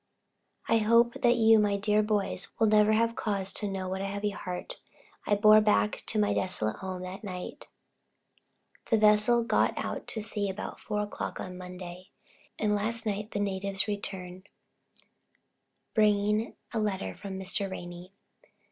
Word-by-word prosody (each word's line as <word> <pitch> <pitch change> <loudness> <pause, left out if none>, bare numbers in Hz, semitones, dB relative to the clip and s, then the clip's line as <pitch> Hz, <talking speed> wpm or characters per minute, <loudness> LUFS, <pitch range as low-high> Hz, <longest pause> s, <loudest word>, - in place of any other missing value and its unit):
I 230 - +4
hope 230 +2 +4
that 240 -2 +4
you, 225 -1 +6
my 205 -1 +2
dear 210 +1 +2
boys, 205 -3 -1
will 225 - +3
never 215 0 +4
have 230 +1 +2
cause 195 -3 -2
to 210 - 0
know 190 -1 -4
what 190 +1 -3
a 195 - -2
heavy 200 +1 -2
heart 180 -2 -6 0.5
I 205 - +4
bore 215 +1 +7
back 210 0 +2
to 225 - +1
my 210 -1 +2
desolate 110 -13 0
home 185 -1 -5
that 185 +3 -7
night. 180 -3 -7 1.2
The 225 - +4
vessel 215 +3 +4
got 235 - +1
out - - -4
to 225 - -2
sea 210 -2 -2
about 190 - -6
4 210 - -2
o'clock 210 - -5
on 185 -1 -6
Monday, 180 0 -9 0.5
and 210 -1 +1
last 225 +3 0
night 210 0 -2
the 205 - -3
natives 195 0 -1
returned, 190 -2 -6 1.4
bringing 210 +1 +2 0.2
a 225 - 0
letter 190 - -2
from 195 -1 -7
Mr. 195 +1 -2
Ranney. 175 0 -8
205 Hz, 155 wpm, -29 LUFS, 190-215 Hz, 1.4 s, bore